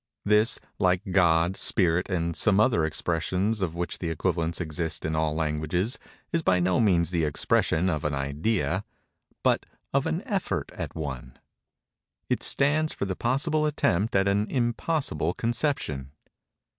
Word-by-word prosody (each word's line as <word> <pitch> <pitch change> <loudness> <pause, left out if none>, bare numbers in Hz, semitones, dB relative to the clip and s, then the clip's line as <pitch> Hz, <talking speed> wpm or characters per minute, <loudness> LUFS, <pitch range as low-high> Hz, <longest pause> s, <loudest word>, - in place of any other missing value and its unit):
This, 105 +3 +4 0.2
like 90 0 +2
"God," 85 -1 +3
"spirit," 90 -2 +2
and 85 -3 -1
some 105 -2 +3
other 110 -7 +3
expressions 90 +7 -1
of 85 -3 -2
which 85 0 -3
the 85 - -3
equivalents 85 0 -1
exist 80 -2 -3
in 80 0 -1
all 80 -1 0
languages, 80 - -1 0.3
is 165 - +2
by 95 - +2
no 90 0 +2
means 90 -6 +3
the 85 -2 0
expression 80 +3 +1
of 75 -5 -1
an 75 -1 -1
idea—but 80 +8 -2 0.3
of - - +2
an - - -2
effort - - -2
at - - -6
one. 65 -5 -6 0.9
It - - +1
stands 155 +3 +2
for - - -3
the 95 -1 -3
possible 150 - +1
attempt 110 - 0
at 95 0 +3
an 100 +2 +1
impossible 120 - -1
conception. 115 - -1
90 Hz, 145 wpm, -26 LUFS, 80-110 Hz, 0.9 s, This